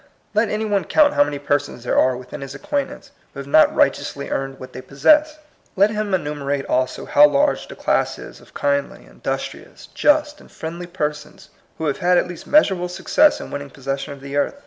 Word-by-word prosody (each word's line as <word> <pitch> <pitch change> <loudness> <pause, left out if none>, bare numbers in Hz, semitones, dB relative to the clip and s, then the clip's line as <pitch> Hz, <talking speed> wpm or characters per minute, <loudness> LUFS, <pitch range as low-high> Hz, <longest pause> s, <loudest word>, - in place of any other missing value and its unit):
Let 215 +1 +2
any 215 +1 -2
one 200 -4 0
count 295 - +4
how - - +5
many 145 0 -4
persons 145 -3 -2
there 120 - -1
are 130 -1 +2
within 125 +3 -9
his 135 0 -7
acquaint 280 - -2
ance 280 - -13 0.2
who - - -7
have 140 - -6
not 155 +3 +4
righteously - - 0
earned 135 0 -3
what 130 0 -10
they 130 - -7
possess. 300 - +3 0.4
Let 200 +3 +4
him 210 -1 -3
enumerate 145 -4 -3
also 130 0 -1
how 145 +1 +6
large 140 -1 +1
the - - -10
class - - 0
is - - -11
of - - -21
kindly, 140 0 -1
in - - -20
dustrious, - - -6
just, 295 0 +2
and - - -18
friendly 170 +2 -7
persons 150 -4 -5 0.3
who 160 - -4
have 145 - -1
had 180 0 +3
at 180 - +2
least 175 -2 -10
measurable 190 -12 +3
success 300 +11 +2
in - - -9
winning 145 0 -6
possession 135 +1 -5
of 140 -1 -10
the 140 +1 -7
earth. 145 - 0
150 Hz, 210 wpm, -21 LUFS, 140-205 Hz, 0.4 s, how